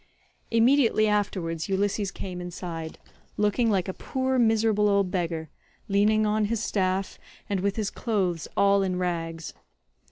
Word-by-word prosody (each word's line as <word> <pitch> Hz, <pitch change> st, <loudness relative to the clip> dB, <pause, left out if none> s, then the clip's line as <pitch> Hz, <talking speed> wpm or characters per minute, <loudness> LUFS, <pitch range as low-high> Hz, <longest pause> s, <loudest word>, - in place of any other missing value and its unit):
Immediately 230 Hz, -1 st, +4 dB
afterwards 185 Hz, -5 st, -1 dB
Ulysses 200 Hz, +1 st, 0 dB
came 180 Hz, -2 st, -6 dB
inside, 170 Hz, -2 st, -6 dB, 0.4 s
looking 210 Hz, +3 st, +2 dB
like 190 Hz, -4 st, +1 dB
a 190 Hz, -, -3 dB
poor 260 Hz, +3 st, -1 dB
miserable 220 Hz, -2 st, +3 dB
old 200 Hz, -2 st, +2 dB
beggar, 165 Hz, -4 st, -2 dB, 0.4 s
leaning 215 Hz, +1 st, +3 dB
on 210 Hz, 0 st, +1 dB
his 225 Hz, +1 st, -1 dB
staff 190 Hz, -2 st, -1 dB, 0.3 s
and 200 Hz, -2 st, -1 dB
with 200 Hz, +1 st, 0 dB
his 215 Hz, -2 st, -2 dB
clothes 190 Hz, -8 st, -1 dB
all 200 Hz, 0 st, +4 dB
in 185 Hz, -2 st, -1 dB
rags. 165 Hz, -2 st, -3 dB
200 Hz, 135 wpm, -26 LUFS, 180-215 Hz, 0.4 s, Immediately